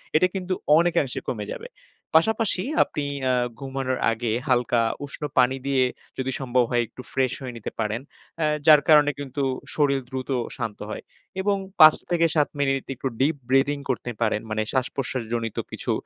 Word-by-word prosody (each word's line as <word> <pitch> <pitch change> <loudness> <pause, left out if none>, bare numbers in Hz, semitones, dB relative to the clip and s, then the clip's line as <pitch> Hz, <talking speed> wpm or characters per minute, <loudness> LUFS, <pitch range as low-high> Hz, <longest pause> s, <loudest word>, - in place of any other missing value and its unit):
এটা 185 +4 +5
কিন্তু 185 -1 -2 0.2
অনেকাংশে 165 -6 +1
কমে 105 -4 -3
যাবে। - - -9 0.5
পাশাপাশি 220 +1 +1 0.2
আপনি 145 -1 -4 0.3
আ - - +2 0.3
ঘুমানোর 135 -1 -3
আগে 115 0 -2 0.2
হালকা 120 -2 +2 0.2
উষ্ণ 140 - -9 0.2
পানি 130 +1 +5
দিয়ে 135 -2 +3 0.3
যদি 130 0 -2
সম্ভব 125 -2 +2
হয় 120 -1 +2
একটু - - -11
ফ্রেশ 130 -2 +1
হয়ে 125 -2 -6
নিতে 115 - -6
পারেন। 110 +2 -1 0.4
অ্যা 155 - +2 0.2
যার 150 -2 +9
কারণে 150 -1 +7
কিন্তু 140 0 -3 0.3
শরীর 140 -2 +2
দ্রুত 130 0 -5 0.3
শান্ত 115 -5 -4
হয়। - - -6 0.4
এবং 200 +1 +1 0.2
৫ 155 -1 +10 0.2
থেকে 170 -1 +3
৭ 150 -2 +3
মিনিট 135 -1 +1
একটু 135 - -3
deep 145 +4 +2
breathing 140 +2 +2
করতে 125 -1 -2
পারেন। 105 -2 +1
মানে 110 0 -1
শ্বাস-প্রশ্বাসজনিত 120 -4 -2
কিছু - - -3
135 Hz, 160 wpm, -24 LUFS, 120-150 Hz, 0.5 s, ৫